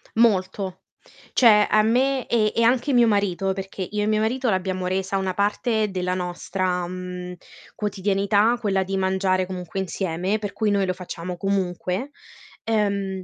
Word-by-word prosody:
Molto. 190 -4 +1 0.5
Cioè, 210 -4 +6
a 215 - +5
me 255 +4 +1
e 215 -3 +2
e 230 - +3
anche 245 +4 +3
mio 240 -2 +5
marito, 195 -2 +1
perché 195 0 -7
io 210 0 -1
e - - 0
mio 215 0 +2
marito 245 +3 0
l'abbiamo 185 -2 -1
resa 190 +1 -1
una 190 -1 -1
parte 210 +2 0
della 180 -1 -1
nostra, 180 0 -2
mhmm, 180 0 -6 0.4
quotidianità 205 +2 +1
quella 195 -4 +1
di 195 +1 -3
mangiare 190 0 +1
comunque 180 0 -5
insieme, 190 +1 -1
per 205 -2 -4
cui 220 -2 0
noi 200 -1 +2
lo 185 - -1
facciamo 180 0 -6
comunque, 190 - -2 0.5
ehm, 200 -3 0
195 Hz, 155 wpm, -23 LUFS, 185-215 Hz, 0.5 s, Cioè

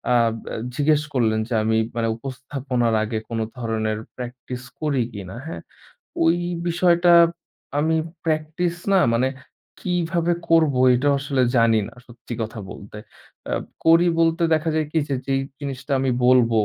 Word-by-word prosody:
আব 115 -2 +3 0.2
আ - - -3 0.2
জিজ্ঞেস 150 +1 +3
করলেন 110 -4 +2
যে 120 - -4
আমি 110 0 +2 0.2
মানে 115 -1 0
উপস্থাপনার 130 -1 -2
আগে 110 +1 -3
কোনো 115 -1 -1
ধরনের 110 -2 -1 0.2
প্র্যাকটিস 125 0 -7 0.2
করি 145 -4 +1
কিনা, 95 -3 -8
হ্যাঁ? 160 - -6 0.6
ওই 165 +1 +4 0.3
বিষয়টা 175 0 +4 0.7
আমি 160 +2 +2 0.3
প্র্যাকটিস 160 +2 -1 0.2
না 195 - +5
মানে 125 +3 +2 0.5
কীভাবে 175 -1 0 0.2
করব 160 -4 +4 0.2
এটাও 140 +3 +2
আসলে 135 -1 0
জানি 115 -1 +4
না - - -13
সত্যি 120 0 -9
কথা 110 +1 -6
বলতে। 100 +1 -10 0.5
অ্যাব - - -2 0.2
করি 165 +2 +6
বলতে 165 +1 +2
দেখা 160 +1 0
যায় 155 -1 +1
কী 165 - +2
যে 140 - 0
যেই 135 0 +1 0.2
জিনিসটা 140 0 -5
আমি 135 -1 +1 0.2
বলব 125 -2 +5
135 Hz, 150 wpm, -22 LUFS, 115-160 Hz, 0.7 s, করি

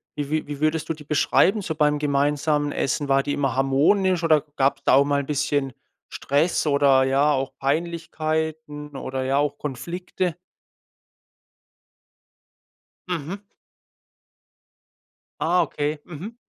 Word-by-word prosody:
wie 145 -1 -3
wie 155 -1 -1
wie 145 -1 -6
würdest 155 +1 0
du - - +1
die 150 -1 -12
beschreiben 175 +7 +2
so 160 -4 -4
beim 150 -1 +2
gemeinsamen 145 +1 +1
Essen? 140 +1 -1
War 135 0 +4
die 145 - -3
immer 135 -2 -1
harmonisch 165 +7 +2
oder 155 -3 +4
gab's 135 0 +1
da - - +4
auch 140 +1 +5
mal 140 0 +1
bisschen 140 -1 -1 0.4
Stress 155 +4 0
oder, 140 -2 +4
ja, 135 +3 +3
auch 135 -1 -1
Peinlichkeiten 155 -1 -3
oder, 130 0 -4
ja, 135 +1 +1
auch 145 0 0
Konflikte? 175 +5 -4 2.7
Mhm. 180 +4 -4 2.0
Ah, 175 +2 +3
okay. 150 -1 -2
Mhm. 180 +8 -9
150 Hz, 125 wpm, -23 LUFS, 140-160 Hz, 2.7 s, auch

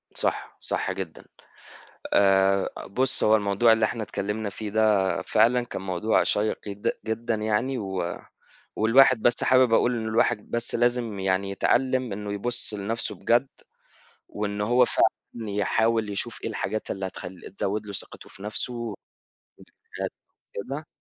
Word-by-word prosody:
صح، - - -1
صح - - -1
جدًا. - - -7 0.9
آآ، 95 -1 +4 0.2
بُص، 130 +6 +2
هو 110 +1 +5
الموضوع 105 +2 +3
اللي 110 -1 +2
إحنا 115 0 -3
اتكلَّمنا 105 +1 -3
فيه 105 +2 -6
ده، 105 -4 +2
فعلًا 120 +3 +3
كان 120 - -6
موضوع 95 +3 +1
شيِّق 105 +1 +1
جد 100 0 -2
جدًا 115 +1 -1
يعني، 110 +5 -1
و 95 -5 -3 0.6
والواحد 120 +1 +5
بس 120 - +2
حابب 130 -2 +4
أقول 125 +2 +3
إن 110 0 -3
الواحد 110 0 0
بس 120 0 -1
لازم 120 -3 0
يعني، 95 +1 0
يتعلَّم 130 +3 +1
إنه 105 0 -5
يبُص 120 +2 0
لنَفْسه 105 +3 -2
بجد، 120 +3 +2 0.8
وإن 105 0 -4
هو 120 +4 +4
فعلًا 115 -2 -1
يحاول 110 +2 +1
يشوف 105 +3 -3
إيه - - -2
الحاجات 110 0 -3
اللي 95 -1 -3
هتخلِّ 90 -1 -9
تزود 105 +2 -2
له 100 - -6
ثقته 100 - -6
في - - -14
نَفْسه. 105 +4 -2
والحاجات 115 -4 -7 1.4
كده 140 +9 -5
110 Hz, 145 wpm, -25 LUFS, 100-120 Hz, 1.4 s, هو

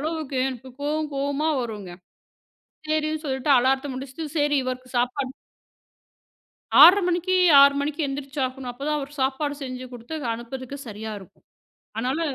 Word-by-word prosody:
அளவுக்கு 310 -2 -3
எனக்குக் 260 +1 -9
கோவம் 305 +1 -1
கோவமா 280 +3 -1
வருங்க. 210 -6 -6 1.0
சேரின்னு 310 0 0
சொல்லிட்டு 265 0 -1
அலாரத்த 265 +3 +1
முடிச்சிட்டு 270 +4 -6
சரி 290 0 +2
இவருக்குச் 255 0 -5
சாப்பாடு 255 +2 -1 1.5
6:30 400 +3 +10
மணிக்கு 360 +1 +1 0.3
6:00 280 0 +7
மணிக்கு 295 +3 -2
எந்திரிச்சு 275 0 -5
ஆகணும். 255 0 -6
அப்பதான் 285 +5 -2
அவரு 280 0 -7
சாப்பாடு 280 +2 0
செஞ்சு 255 -1 -6
கொடுத்து 245 +6 -7 0.2
அனுப்புவதற்கு 260 +4 -7
சரியா 220 0 -6
இருக்கும். 190 - -18 0.5
ஆனாலும் 275 +5 -1
275 Hz, 130 wpm, -24 LUFS, 255-300 Hz, 1.5 s, 6:30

